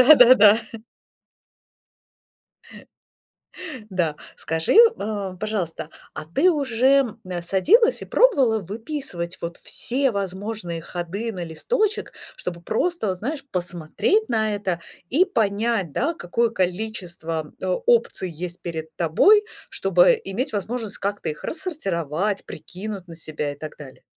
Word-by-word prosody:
да-да-да. 250 -6 +8 2.1
Э. - - -13 1.1
Да, 170 -5 0 0.2
скажи, 160 - 0 0.2
а, 200 -3 -3
пожалуйста, 185 -7 -3 0.3
а - - -6
ты 170 - +3
уже, 270 - +2
м, 180 -2 -4
садилась 415 - +3
и - - -4
пробовала 275 - +4
выписывать 205 - -5
вот 170 0 -5
все 265 +2 -1
возможные 195 -2 -4
ходы 190 +7 -4
на 180 -3 -5
листочек, 425 - -1 0.2
чтобы 170 -1 -5
просто, 340 - -1
вот 185 -1 -2
знаешь, 275 +6 -4
посмотреть 180 - 0
на 220 -2 +1
это 190 -4 -2 0.3
и 330 +9 +5
понять, 215 - 0
да, 290 - 0
какое 230 - 0
количество, 175 -6 -3
а, - - -2 0.2
опций 230 -6 +2
есть 175 +2 -5
перед 160 -2 -6
тобой, 390 - +5 0.2
чтобы 185 -2 +4
иметь 210 +8 -3
возможность 220 +1 -3
как-то 205 +1 -2
их 150 - -5
рассортировать, 195 - -2
прикинуть 195 0 -7
на 165 - -9
себя 150 -2 -4
и 145 - -13
так 155 0 -8
далее? 135 -3 -12
200 Hz, 120 wpm, -23 LUFS, 170-240 Hz, 2.1 s, да-да-да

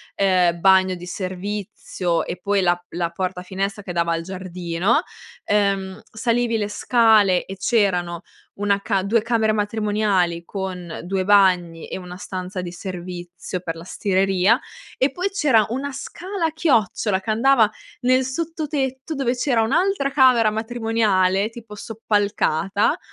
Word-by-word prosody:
ehm, 180 -3 +2
bagno 190 0 +5
di 175 0 -9
servizio 185 -1 -3
e - - -5
poi 200 -1 +1
la 175 -1 +1
la 170 -1 -2
porta-finestra 190 +3 -3
che 185 - -6
dava 170 -1 0
al 165 - -2
giardino. 185 - -1 0.4
Ehm, 195 -2 0
salivi 230 +1 0
le 205 -1 -2
scale 215 -5 +3
e 195 - -8
c'erano 180 -5 +1 0.4
1 200 -1 +1
ca 195 -3 0
2 220 +3 +2
camere 225 -1 +1
matrimoniali 205 -5 0
con 180 -4 -5
2 190 +1 -2
bagni 180 -5 +3
e - - -4
1 180 -1 -8
stanza 185 0 -5
di 175 -1 -6
servizio 180 -1 -6
per 165 -2 -4
la 165 - -9
stireria 195 +3 +2 0.4
e 265 +1 +2
poi 360 +7 -2
c'era 270 - +3
1 270 +4 -3
scala 360 +6 -5
a 320 - +1
chiocciola 220 - +1
che 190 - -8
andava 230 -1 +4 0.3
nel 255 +1 +3
sottotetto 290 -1 -3
dove 255 -2 0
c'era 245 -2 +1
un'altra 280 - +1
camera 255 -5 +5
matrimoniale, 220 -3 +1
tipo 225 -2 -11
soppalcata, 205 -3 0
200 Hz, 140 wpm, -22 LUFS, 185-230 Hz, 0.4 s, bagno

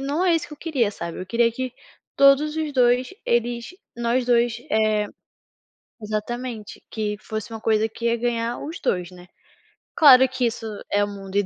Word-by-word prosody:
não 285 +6 -1
é 350 -2 +4
isso 320 - -4
que - - -13
eu - - -26
queria, 270 -10 0
sabe, 170 -3 -6
eu 185 - -6
queria 230 +4 +2
que 255 +1 -4 0.4
todos 280 +2 +5
os 310 -2 -2
2, 250 +2 +2
eles 235 0 0 0.3
nós 240 +2 0
2, 240 -1 +2
eh, 215 -1 +2 0.9
exatamente, 215 +1 -5
que 210 -2 -2
fosse 215 0 -6
uma 225 - -6
coisa 220 0 +2
que 230 +2 -10
ia 235 0 +2
ganhar 235 0 -2
os 320 +4 -6
2, 180 -1 -1
né. 180 -1 -14 0.7
Claro 260 -4 +8
que 255 0 -2
isso 225 -1 -3 0.3
é 205 - +3
o - - -4
mundo 195 -1 -8
235 Hz, 180 wpm, -23 LUFS, 215-255 Hz, 0.9 s, Claro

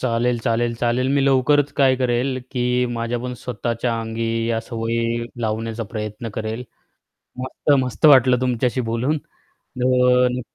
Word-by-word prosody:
चालेल, 120 0 0
चालेल, 115 0 0
चालेल. 120 +2 0
मी 140 - +3
लवकरच 140 +2 +3
काय 135 -2 +4
करेल, 130 +1 0
की 125 -1 0
माझ्या 115 +1 -2
पण 125 +1 -5
स्वतःच्या 115 0 -2
अंगी 115 0 -2
या 115 -1 0
सवयी 115 0 -2 0.2
लावण्याचा 115 +1 -2
प्रयत्न 110 +1 -5
करेल. 110 +3 -4 0.7
मस्त-मस्त 130 +2 +1
वाटलं 130 -3 +6
तुमच्याशी 125 0 0
बोलून, 130 +7 0
तर 125 -1 0
120 Hz, 125 wpm, -21 LUFS, 115-130 Hz, 0.7 s, वाटलं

